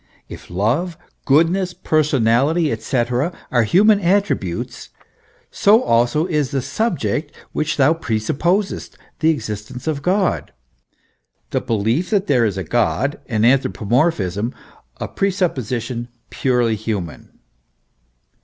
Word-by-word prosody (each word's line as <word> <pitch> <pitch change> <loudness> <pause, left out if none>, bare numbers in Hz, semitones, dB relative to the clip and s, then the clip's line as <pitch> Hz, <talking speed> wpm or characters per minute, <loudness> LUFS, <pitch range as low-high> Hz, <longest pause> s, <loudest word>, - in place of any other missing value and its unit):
If - - -11
love, 125 - 0 0.3
goodness, 175 +6 +2
per 155 0 +1
sonality, 140 +3 +2
&c., 125 +7 -1 0.2
are 120 -2 +3
human 200 - +4
attributes, 180 - -1 0.6
so 215 +5 +4
also 120 +7 +2
is 150 -7 0
the 135 -2 -2
subject 160 - -1 0.2
which 155 0 -1
thou 140 +2 +5
pre 130 -9 -2
supposest, 170 - -1 0.2
the 160 0 +3
existence 115 -4 -4
of 150 -3 -2
God, 185 +4 0 1.0
the - - 0
belief 115 - 0
that 205 -3 +1
there 125 - +3
is 100 -3 -1
a 95 - -2
God, 120 - 0
an 110 -3 +1
anthropomorphism 115 - +1 0.4
a - - -4
pre 195 - 0
supposition 125 - -2 0.2
purely 125 -4 +1
human. 105 -6 -5
135 Hz, 115 wpm, -20 LUFS, 115-170 Hz, 1.0 s, thou